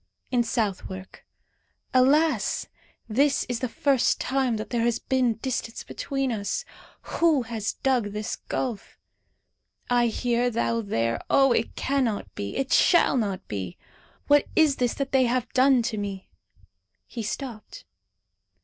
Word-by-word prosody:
In 245 -2 +3
Southwark. 195 -4 -3 0.7
Alas! 265 -2 +3 0.4
this 275 +5 +2
is 245 -2 -2
the 255 - -2
first 275 +1 +2
time 260 -3 0
that 215 - -6
there 240 -2 +1
has 235 0 +2
been 255 -3 +1
distance 240 -1 -4
between 270 -2 -3
us. 220 - -2 0.5
Who 320 -6 +4
has 225 -2 -3
dug 255 -4 +1
this 210 +1 -4
gulf? 240 -6 -4 0.9
I 240 -1 +4
here, 240 +1 0
thou 230 0 0
there. 115 - -1
Oh, 270 -1 +5
it 230 - 0
cannot 260 -6 -1
be; 100 0 -5
it 270 -1 0
shall 345 -5 +5
not 200 -6 -2
be! 95 -4 -5 0.5
What 290 0 +4
is 310 -4 +4
this 245 -2 0
that 275 -1 -3
they 265 -1 +4
have 250 0 -1
done 260 -1 +4
to 225 -2 -2
me?" 195 -2 -6 0.7
He 235 - -6
stopped. 230 0 -6
240 Hz, 140 wpm, -26 LUFS, 215-265 Hz, 0.9 s, Oh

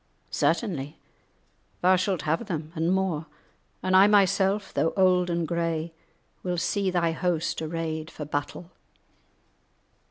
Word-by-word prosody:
"Certainly 155 - -1 0.8
thou 185 +1 +5
shalt 185 -3 -1
have 160 +8 -1
them, 160 -4 -4
and 165 +1 0
more, 185 -5 0 0.6
and 185 0 +2
I 190 +2 +8
myself, 200 0 +2
though 165 - +1
old 180 -1 +4
and 170 -1 -1
grey, 165 -1 -2 0.5
will 180 -1 -2
see 195 +3 0
thy 175 -2 +1
host 170 -1 -1
arrayed 160 0 -3
for 150 - -7
battle." 145 +4 -4
170 Hz, 125 wpm, -26 LUFS, 160-185 Hz, 0.8 s, I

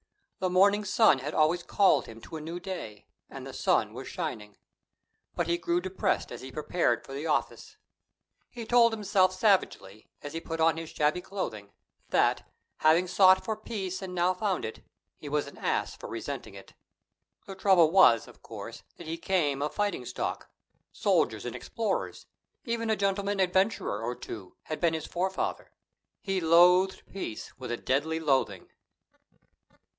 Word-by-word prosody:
The 185 - 0
morning 200 +3 +4
sun 205 - +4
had 145 +4 -5
always 160 +3 +3
called 195 +2 +3
him 115 0 -11
to 160 - -10
a 155 - -5
new 165 +3 -6
day, 175 - -7 0.2
and - - -9
the - - -8
sun - - +1
was - - -8
shining. 105 -1 -5 0.8
But 175 - 0
he 170 +1 0
grew 175 0 0
depressed 185 +1 -1
as - - -7
he 130 - -9
prepared 155 +5 0
for 135 - -10
the 145 +4 -4
office. 155 - -2 0.7
He 235 -2 -8
told 235 0 +5
himself 200 -4 +2
savagely, 185 - 0
as 145 +1 -7
he 165 - -4
put 165 -1 -5
on 160 0 +3
his 165 -1 -6
shabby 150 +4 0
clothing, 110 - -5 0.4
that, - - +1 0.3
having 160 +3 +4
sought 190 +1 +5
for 220 - -1
peace 195 -4 -5
and 185 -1 -6
now 180 +1 +2
found 190 0 -1
it, 110 - -7 0.4
he 145 - -8
was 150 0 0
an 140 - -12
ass - - -1
for - - -9
resenting - - -6
it. - - -13 0.7
The 195 - -7
trouble 190 -4 +4
was, 165 - +6
of - - -16
course, - - -9 0.2
that 170 - -10
he 165 +1 -5
came 150 -7 0
of 150 +1 -2
fighting 205 0 -1
stock: - - -4 0.4
soldiers - - +1
and - - -5
explorers, - - -3 0.4
even 230 -2 -2
a 220 - +3
gentleman 200 0 -1
adventurer 190 - +1
or 120 +2 -3
two, 95 -7 -9
had 155 - -5
been 165 -2 +2
his 160 - -4
forefather. 190 +2 -3 0.5
He 195 -2 -2
loathed 180 +3 +5
peace 185 - -7
with 130 - -6
a 120 - -2
deadly 155 +7 0
loathing. 140 -4 0
175 Hz, 170 wpm, -28 LUFS, 150-190 Hz, 0.8 s, was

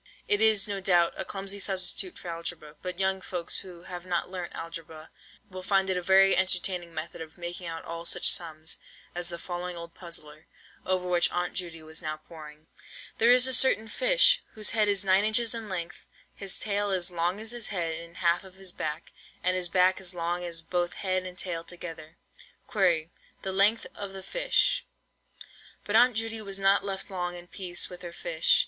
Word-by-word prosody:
It 205 +1 +4
is, 220 -2 +6
no 200 -1 -2
doubt, 175 -3 +3
a - - -3
clumsy 195 +1 -5
substitute 195 - 0
for - - -10
algebra; 165 -2 -5
but 180 -1 -4
young 190 0 +1
folks 175 -2 -1
who 175 -2 -9
have 180 -1 -7
not 180 0 -2
learnt 180 -2 -5
algebra, 165 -1 -7 0.4
will 185 -2 -8
find 195 0 +2
it - - +1
a 180 - 0
very 195 +2 +6
entertaining 180 -2 +1
method 160 0 -6
of 160 -1 -9
making 175 0 -5
out 165 0 -5
all 170 0 -5
such 175 +1 +3
sums 160 -2 -3 0.3
as 175 0 -3
the 170 - -5
following 175 0 -5
old 170 0 -8
puzzler, 155 -4 -9 0.4
over 185 -1 +1
which 175 -1 +3
Aunt 175 0 -1
Judy 170 -3 -4
was 160 +2 -6
now 155 -2 -3
poring: 155 -1 -12 0.5
"There 230 - +5
is 250 +1 +7
a 260 - +1
certain 240 -3 +4
fish, - - +4
whose 215 -1 -1
head 215 -2 +3
is 200 -1 +2
9 190 +1 +5
inches 220 +2 +3
in 225 -2 -5
length, 175 -3 -5 0.3
his 195 -2 -1
tail 205 -1 0
as 185 -1 +2
long 175 +3 0
as 220 +1 -1
his 240 -2 -3
head 170 -4 -1
and 170 +1 -8
half 170 0 +2
of 190 -1 -14
his 190 -1 -5
back, 155 -1 -4 0.3
and 185 +1 +3
his 180 -1 -1
back 185 +1 +3
as 185 -1 -1
long 175 +1 -1
as 170 -1 -4
both 175 +1 -1
head 185 -1 -1
and 180 0 -9
tail 170 -3 -2
together. 170 -2 -8 0.5
Query, 175 -6 +2 0.3
the 190 - -2
length 200 +4 +4
of 200 -1 -6
the 190 0 -7
fish?" - - +2 1.0
But 205 - -1
Aunt 245 +1 +6
Judy 225 0 -2
was 195 -2 -3
not 195 +1 +4
left 195 0 -5
long 175 -1 -3
in 175 0 -9
peace 175 -1 -2
with 180 0 -10
her 175 -1 -7
fish. - - +3
180 Hz, 200 wpm, -28 LUFS, 170-195 Hz, 1.0 s, is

